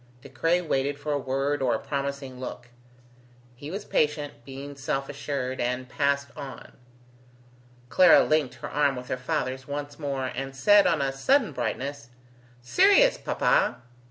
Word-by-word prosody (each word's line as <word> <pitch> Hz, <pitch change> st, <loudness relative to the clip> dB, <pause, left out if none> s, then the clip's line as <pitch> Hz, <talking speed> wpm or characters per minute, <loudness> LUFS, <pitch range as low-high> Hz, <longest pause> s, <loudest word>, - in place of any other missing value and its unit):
De 140 Hz, -, -11 dB
Craye 165 Hz, +8 st, +1 dB
waited 140 Hz, -2 st, -1 dB
for 145 Hz, +1 st, -3 dB
a 145 Hz, -, 0 dB
word 135 Hz, +2 st, -1 dB
or 125 Hz, -3 st, +2 dB
a -, -, -3 dB
promising 140 Hz, -2 st, -4 dB
look. 125 Hz, -1 st, -7 dB, 0.9 s
He 145 Hz, +4 st, -9 dB
was 200 Hz, +4 st, -5 dB
patient, 150 Hz, -1 st, 0 dB
being 140 Hz, +2 st, -8 dB
self 135 Hz, 0 st, -3 dB
assured, 135 Hz, -2 st, -4 dB
and 125 Hz, +1 st, -2 dB
passed 140 Hz, 0 st, 0 dB
on. 135 Hz, -4 st, -9 dB, 1.2 s
Clara 180 Hz, +5 st, +7 dB
linked 155 Hz, -4 st, +1 dB
her -, -, -7 dB
arm 145 Hz, -2 st, +2 dB
with 125 Hz, 0 st, -8 dB
her -, -, 0 dB
father's 130 Hz, +1 st, -3 dB
once 145 Hz, +1 st, -5 dB
more, 140 Hz, -3 st, -2 dB
and 135 Hz, +2 st, -5 dB
said, 205 Hz, +9 st, +5 dB
on 160 Hz, -5 st, +2 dB
a 135 Hz, 0 st, -1 dB
sudden 235 Hz, -, +2 dB
brightness: 125 Hz, +1 st, -4 dB, 0.5 s
"Sirius, 410 Hz, -, +5 dB
papa!" -, -, +1 dB
140 Hz, 155 wpm, -26 LUFS, 130-150 Hz, 1.2 s, Clara